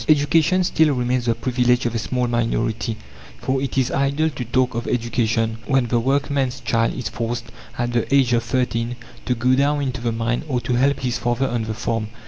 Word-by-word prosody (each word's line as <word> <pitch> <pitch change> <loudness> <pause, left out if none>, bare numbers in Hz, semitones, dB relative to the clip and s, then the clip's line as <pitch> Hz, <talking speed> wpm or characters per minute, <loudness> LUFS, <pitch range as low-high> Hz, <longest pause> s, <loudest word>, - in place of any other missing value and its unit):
Education 155 +5 +4
still 160 -4 +3
remains 125 0 0
the 115 - +2
privilege 125 +1 +1
of 120 - 0
a 115 - -1
small 125 +3 -1
minority, 115 -1 -1 0.4
for 130 0 -1
it 135 -1 -3
is 130 -2 +2
idle 140 +3 +1
to 130 -3 -5
talk 125 +2 +1
of 115 +1 -3
education 115 -2 0
when 135 -3 +2
the 120 - +2
workman's 135 +1 0
child 115 -1 +1
is 125 -5 -3
forced, 115 +2 -4 0.3
at 120 0 -1
the 120 +2 0
age 135 -3 +4
of 120 - +3
thirteen, 120 -1 -1 0.3
to 125 - +1
go 125 +2 +2
down 140 +2 +2
into 130 -2 -3
the 120 -1 0
mine 115 +1 -1
or 130 -4 0
to 125 - -2
help 135 +3 +2
his 125 -1 -1
father 120 +2 0
on 120 -3 -2
the 110 0 -4
farm. 115 -2 -2
125 Hz, 205 wpm, -21 LUFS, 115-135 Hz, 0.4 s, Education